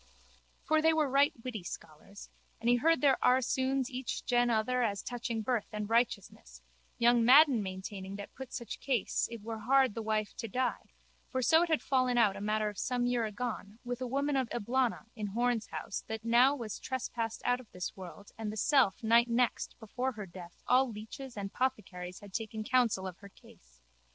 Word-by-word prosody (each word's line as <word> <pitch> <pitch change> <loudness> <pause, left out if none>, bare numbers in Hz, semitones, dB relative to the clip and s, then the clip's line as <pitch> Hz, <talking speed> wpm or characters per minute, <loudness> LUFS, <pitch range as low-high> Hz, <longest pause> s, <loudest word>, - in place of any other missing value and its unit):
For 315 0 +2
they 320 +1 +4
were 310 -2 +2
right 275 +2 +4
witty 245 -5 -4
scholars. 175 +3 -10 0.3
And 230 - -4
he 245 - +5
heard 325 +6 +3
their 280 -3 +4
aresouns 260 +1 +2
each 255 0 -4
gen 245 -1 +3
other 240 +3 +1
as 205 -4 -1
touching 235 -2 -3
birth 240 -2 0
and 210 -1 -4
righteousness, 200 - -1 0.3
young 235 0 +4
Madden 265 -1 +7
maintaining 190 0 -6
that 200 0 -8
put 265 -1 -9
such 235 - -6
case 255 -7 0
it 230 -3 -8
were 225 0 -5
hard 260 +1 +3
the 225 - -4
wife 215 -1 -1
to 230 - -4
die 250 +4 -2 0.4
(for 260 0 -1
so 320 +5 +5
it 345 - +1
had 315 - +1
fallen 255 -2 +2
out 215 -5 +4
a - - -7
matter 215 +1 0
of 205 -1 -5
some 245 -1 0
year 245 -2 +1
agone 215 -1 -5
with 245 0 -4
a 255 - -2
woman 280 +3 0
of 260 -3 0
Eblana 240 +1 0
in 210 -3 -3
Horne's 235 +1 0
house - - -5
that 220 0 -5
now 245 +4 +5
was 230 -6 -6
trespassed 235 -3 -4
out 245 0 +2
of 250 - -14
this 180 -1 -5
world 190 +2 -10
and 215 -2 -3
the 215 - -7
self 260 -5 +3
night 235 +2 +4
next 235 0 0
before 250 +4 -3
her 210 -3 -6
death 175 -1 -12
all 255 +1 +4
leeches 230 +4 -8
and 195 -1 -5
pothecaries 185 -8 -3
had 200 -2 -13
taken 220 0 -4
counsel 230 -5 +2
of 185 -2 -6
her 200 - -12
case). - - -21
235 Hz, 195 wpm, -32 LUFS, 210-255 Hz, 0.4 s, Madden